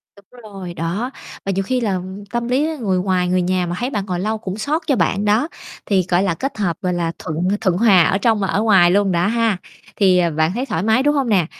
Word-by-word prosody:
Đúng 220 +5 -18
rồi, 195 -4 -8
đó, 175 +10 -3 0.3
và 195 - 0
nhiều 195 +1 -1
khi 255 +5 -1
là 195 -5 0 0.3
tâm 235 0 -2
lý 270 +5 +1
người 190 -5 0
ngoài 180 -1 0
người 180 0 +1
nhà 180 0 0
mà 175 - -3
thấy 250 - -1
bạn 205 -6 -3
ngồi 180 -2 -3
lâu 215 +4 -1
cũng 200 -2 -6
xót 300 +9 -1
cho 275 - +3
bạn 195 +2 0
đó, 215 +7 +2 0.4
thì, 190 -4 +1
gọi 180 +2 +3
là, 190 - +1
kết 265 - -4
hợp, 175 -5 -1
gọi 180 -1 -1
là, 170 -1 -1
thuận 155 0 -5 0.2
thuận 185 -4 +1
hòa 195 -6 +5
ở 195 - +2
trong 220 +1 +2
và 195 - 0
ở 200 - 0
ngoài 190 -6 +5
luôn 200 0 +2
đó 175 +2 +1
ha, 225 -3 +1 0.4
thì, 190 -3 +4
ờ, 170 -2 +1
bạn 155 +2 +1
thấy 250 +4 -2
thoải 165 -9 -2
mái, 225 +5 +3
đúng 295 0 +2
hông 270 -4 0
nè? 185 -6 +3
195 Hz, 260 wpm, -19 LUFS, 180-225 Hz, 0.4 s, hòa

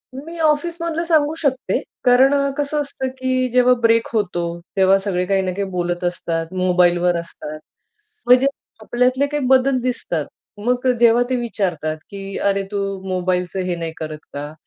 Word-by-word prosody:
मी 325 +6 -8
ऑफिसमधलं 330 +2 0
सांगू 310 -2 +3
शकते. 265 -5 0 0.2
कारण 255 +3 +5 0.2
कसं 290 +1 0
असतं, 270 -2 -4
की 255 0 0
जेव्हा 250 0 +5
ब्रेक 230 0 +3
होतो 185 -6 0 0.3
तेव्हा 190 0 +5
सगळे 190 -2 -1
काही 195 +1 +1
ना 185 -1 -2
काही 200 +2 -2
बोलत 175 -1 -2
असतात, 165 -2 -2
मोबाईलवर 180 -1 +3
असतात. 155 -2 -8 0.7
म्हणजे 250 +2 +6 0.4
आपल्यातले 250 +4 +1
काही 295 -1 -2
बदल 265 0 +4
दिसतात 205 - -2 0.4
मग 250 +1 +1
जेव्हा 235 0 +5
ते 255 - +2
विचारतात, 180 -10 -2
की 195 -1 -7
"अरे, 200 0 +1
तू 205 - -2 0.3
मोबाईलचं 185 0 -1
हे 180 -1 -1
नाही 165 -1 -4
करत 155 -1 -6
का 145 +1 -6
215 Hz, 150 wpm, -20 LUFS, 180-260 Hz, 0.7 s, म्हणजे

